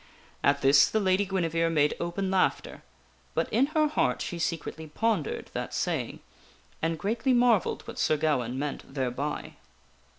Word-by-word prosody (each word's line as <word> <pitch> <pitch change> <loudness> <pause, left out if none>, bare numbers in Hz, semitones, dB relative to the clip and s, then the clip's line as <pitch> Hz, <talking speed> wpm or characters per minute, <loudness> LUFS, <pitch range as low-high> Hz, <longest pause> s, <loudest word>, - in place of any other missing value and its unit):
At 140 0 +2
this 140 +1 +6
the 220 - +1
Lady 190 0 +2
Guinevere 165 -3 0
made 150 -2 +2
open 185 +3 -2
laughter; 190 -1 0 0.5
but - - +1
in 250 +6 +4
her 310 0 +2
heart 125 - 0
she 175 - -4
secretly 160 -1 -3
pondered 205 0 -1
that - - -4
saying - - -2 0.6
and 165 0 0
greatly 225 - 0
marvelled 240 -5 +3
what 235 +2 -8
Sir 155 - +2
Gawaine 130 -5 0
meant 145 0 -4
thereby. 135 +2 -3
165 Hz, 145 wpm, -28 LUFS, 145-215 Hz, 0.6 s, this